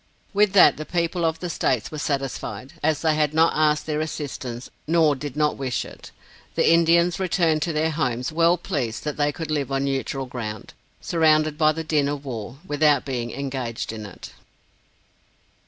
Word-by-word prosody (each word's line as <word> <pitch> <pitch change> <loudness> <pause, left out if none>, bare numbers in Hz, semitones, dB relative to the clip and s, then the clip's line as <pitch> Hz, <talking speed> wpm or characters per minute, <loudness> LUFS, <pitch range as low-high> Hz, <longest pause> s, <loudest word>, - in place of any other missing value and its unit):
With 205 -1 +3
that 195 - +7
the 155 - -4
people 170 +1 -1
of 160 0 -1
the 175 - -3
states 125 -7 0
were 155 - -5
satisfied, 135 -4 -3
as 155 +1 +1
they 160 -1 +3
had 150 0 0
not 165 +1 +4
asked 150 -1 +2
their 155 -1 -1
assistance, 135 -6 -5 0.2
nor 160 -2 +4
did 145 +1 -7
not 150 -1 +1
wish 130 -2 -2
it. - - -12 0.5
The - - +2
Indians 170 +1 +3
returned 170 -4 +1
to 170 - 0
their 160 +1 0
homes 125 -5 -1
well 170 +2 +3
pleased 135 - -3
that 150 -2 -3
they 145 0 +2
could 155 +1 -6
live 140 -3 -1
on 135 0 0
neutral 135 0 -2
ground, 110 -4 -6 0.3
surrounded 155 -2 +3
by 155 0 +4
the 160 +1 -4
din 150 -3 +1
of 145 0 -4
war, 120 -1 -6
without 145 -3 +2
being 125 -4 -3
engaged 130 -4 -4
in 110 -2 -7
it. 95 - -11
150 Hz, 180 wpm, -23 LUFS, 135-160 Hz, 0.5 s, that